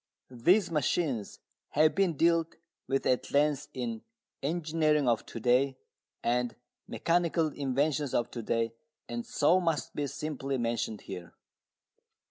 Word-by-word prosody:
These 170 - +3
machines 145 - 0 0.4
have 155 +1 +4
been 190 -6 +1
dealt 165 0 +2 0.3
with 135 0 0
at 125 - +1
length 145 -1 +2
in 115 -3 -4 0.4
Engineering 155 -2 +1
of 115 -2 +1
To - - -6
day 130 +3 +2 0.5
and 120 0 0 0.3
Mechanical 170 -1 +1
Inventions 140 0 0
of 120 0 0
To 120 - -5
day 115 0 0 0.3
and 240 - -4
so 185 -7 +3
must 165 -4 -1
be 145 -1 -1
simply 140 -2 -3
mentioned 115 -3 -2
here. 90 -3 -8
140 Hz, 125 wpm, -30 LUFS, 120-165 Hz, 0.5 s, have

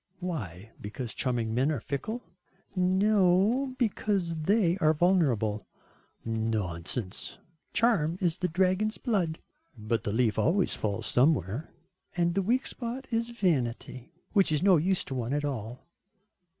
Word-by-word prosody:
"Why 110 - -5
because 110 +3 -5
charming 120 -4 -1
men 130 +6 +2
are 145 - -1
fickle?" 215 - -4 0.5
"No, 195 +6 +3
because 200 -7 0
they 175 +2 +2
are 155 -2 +3
vulnerable." 135 - +1 0.6
"Nonsense." 110 -3 -3 0.3
"Charm 180 -9 +2
is 175 -2 0
the 180 - +1
dragon's 185 +5 +1
blood." 185 - 0 0.4
"But 110 +1 -2
the 105 - -2
leaf 110 -1 +1
always 185 +3 +2
falls 100 -2 -2
somewhere." 125 - +1 0.5
"And 170 0 +2
the 195 - +1
weak 245 +7 +1
spot 250 +2 -4
is 230 +1 0
vanity 130 - -1 0.2
which 195 -5 +4
is 150 +1 +1
no 190 -3 +6
use 185 +4 +1
to - - -6
one 125 0 -2
at 145 0 0
all." 125 -3 -5
160 Hz, 135 wpm, -29 LUFS, 120-195 Hz, 0.6 s, no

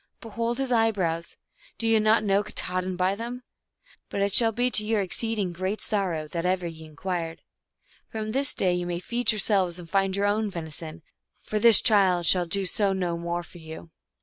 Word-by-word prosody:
Behold 230 +1 -3
his 270 -1 -2
eyebrows; 195 -8 0 0.4
do 230 - -1
ye 225 -1 +4
not 215 +1 +3
know 200 -1 +2
Katahdin 185 -3 -2
by 185 +1 +1
them? 240 +4 -6 0.7
But 200 - -3
it 200 -1 -1
shall 225 0 +4
be 245 +3 0
to 215 - +2
your 215 0 0
exceed 225 +4 -2
ing 185 -4 -1
great 185 +4 -3
sorrow 180 -7 -2
that 170 +1 -3
ever 180 0 0
ye 160 -1 -7
inquired. 165 +1 -5 0.7
From 215 -1 -4
this 275 +3 +1
day 185 -2 +1
ye 180 0 -1
may 175 -1 -3
feed 240 +7 +1
yourselves 195 -4 +1
and 175 -2 -9
find 195 +1 +1
your 200 0 0
own 210 +1 +1
veni 165 -4 -6
son, 160 +1 -6 0.4
for 215 - -2
this 230 0 +8
child 190 -6 +3
shall 175 +1 +3
do 195 +3 0
so 195 +1 +1
no 180 -3 -1
more 170 +1 -3
for 175 - -15
you." 160 -1 -9
THUNDER 165 - -12
STORIES. - - -51
195 Hz, 205 wpm, -26 LUFS, 175-215 Hz, 0.7 s, this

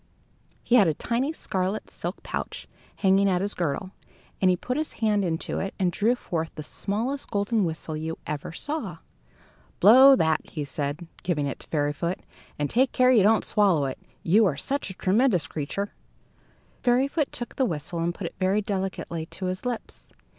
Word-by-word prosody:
He - - -1
had 205 -6 +6
a 155 - +1
tiny 245 - -1
scarlet 190 -9 -2
silk - - -6
pouch - - -5 0.3
hanging 195 0 +3
at 180 -1 +2
his 205 +1 0
girdle, 175 +3 -2 0.5
and 185 - +5
he 180 - +4
put 250 +7 -3
his 310 +2 -2
hand 210 -3 +1
into 165 -3 -2
it 195 - -4
and 185 -3 +1
drew 225 +7 +2
forth 165 -8 -3
the 155 - -6
smallest 230 - -2
golden 205 0 +1
whistle 160 -1 -4
you 160 +1 -4
ever 150 +1 -4
saw. 300 - -4 0.8
"Blow 260 +6 +9
that," 160 -9 +2
he 150 - -4
said, 145 +4 -4 0.2
giving 160 -5 0
it 140 - -4
to - - -14
Fairyfoot, 150 +3 -1 0.4
"and 145 - 0
take 255 - +2
care 255 0 +5
that 250 - +5
you - - +7
don't 215 +3 +4
swallow 190 -9 +3
it. 130 - -4 0.2
You 205 +5 +5
are - - -1
such 280 -5 -2
a 190 - -8
tremendous 195 - +2
creature!" 160 +7 -4 0.9
Fairyfoot 270 +5 +2
took 240 - -5
the 265 - +3
whistle 165 - -3
and 170 +1 +1
put 175 +1 -7
it - - -5
very 195 +3 +2
delicately 190 -5 -3
to 185 - -6
his 185 +6 -3
lips. 245 -2 -6
190 Hz, 185 wpm, -26 LUFS, 165-230 Hz, 0.9 s, Blow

